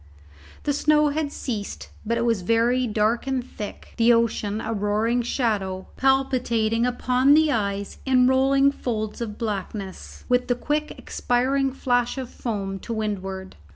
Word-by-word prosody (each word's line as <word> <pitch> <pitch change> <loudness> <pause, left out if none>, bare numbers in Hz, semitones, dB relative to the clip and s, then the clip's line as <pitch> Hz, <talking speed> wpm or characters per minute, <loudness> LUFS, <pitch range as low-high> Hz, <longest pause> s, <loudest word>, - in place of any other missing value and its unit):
The 290 - +1
snow 300 +1 +3
had 290 0 -2
ceased; 215 -8 -5
but 230 +2 -1
it 235 - 0
was 230 -5 +1
very 235 +5 +2
dark 220 +3 +1
and 265 -2 0
thick, 210 -5 -8
the 235 0 +5
ocean 220 -2 0
a 225 0 -3
roaring 215 +3 +1
shadow, 205 -6 -1
palpitating 250 -4 +2
upon 250 +3 +3
the 310 -1 +4
eyes 200 -4 -2
in 255 -2 +4
rolling 270 +2 +4
folds 215 -5 -4
of 210 -3 -4
blackness, 200 -3 -5
with 250 0 +2
the 245 - +2
quick 300 +4 -1
expiring 265 +2 0
flash 245 -1 0
of 260 -2 -5
foam 195 -4 -4
to 230 - -8
windward. 195 -3 -4
235 Hz, 150 wpm, -24 LUFS, 210-260 Hz, -, the